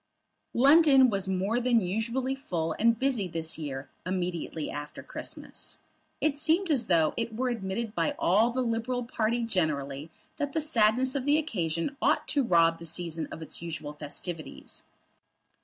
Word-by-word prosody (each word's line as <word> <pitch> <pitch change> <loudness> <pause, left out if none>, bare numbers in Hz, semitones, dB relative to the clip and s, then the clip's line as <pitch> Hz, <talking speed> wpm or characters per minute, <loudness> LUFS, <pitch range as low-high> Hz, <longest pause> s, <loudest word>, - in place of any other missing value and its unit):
London 275 -1 +6
was 195 -1 0
more 190 +5 0
than 245 -1 +3
usually 230 +7 -1
full 165 - -3
and 230 +1 +4
busy 250 -6 +1
this 165 -1 -1
year 135 -3 -5 0.2
immediately 175 -3 -3
after 145 0 -7
Christmas. - - -5 0.4
It 310 -2 +1
seemed 325 +4 +2
as 255 -6 +2
though 165 -4 +3
it 230 -1 -3
were 255 +1 0
admitted 215 0 -3
by 290 +5 0
all 240 -9 +3
the 255 +1 -1
Liberal 240 +2 -1
party 235 0 -1
generally 150 -8 -1 0.3
that 285 -2 -2
the - - +1
sadness 255 -3 +3
of 270 -2 -2
the 290 +1 +4
occasion 185 - -1
ought - - +2
to 285 -2 +2
rob 165 -6 +3
the 170 - -8
season 165 -1 -2
of 160 - -7
its 160 - -6
usual 160 -3 -5
festivities. 155 +2 -5
220 Hz, 155 wpm, -28 LUFS, 165-260 Hz, 0.4 s, London